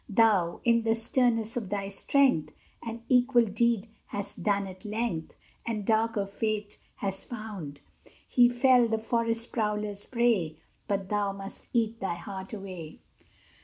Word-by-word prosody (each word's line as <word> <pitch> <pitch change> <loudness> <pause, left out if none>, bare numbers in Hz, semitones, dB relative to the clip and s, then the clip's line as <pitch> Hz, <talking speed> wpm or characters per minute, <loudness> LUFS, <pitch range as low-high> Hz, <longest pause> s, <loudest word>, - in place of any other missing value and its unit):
Thou, 200 -6 +3
in 235 -1 +4
the 225 0 +2
sternness 230 -1 +2
of 225 -6 -3
thy 200 -1 -2
strength, 255 - +2 0.3
An 230 0 -6
equal 245 -1 +4
deed 225 +1 +1 0.2
hast 200 -1 -3
done 200 -1 +1
at 185 +1 -10
length, 215 -6 -2 0.3
And 215 -3 -3
darker 220 -1 +2
fate 210 +1 -3 0.2
hast 195 -1 -4
found: 205 - -7 0.5
He 245 -1 +5
fell, 245 0 +5
the 225 0 0
forest 230 +1 0
prowlers' 210 -2 -2
prey; 225 -11 +1 0.3
But 195 -1 -1
thou 205 -1 0
must 195 0 -8
eat 225 -1 0
thy 190 -3 -2
heart 190 +2 -7
away! 185 -6 -7
215 Hz, 140 wpm, -29 LUFS, 195-230 Hz, 0.5 s, He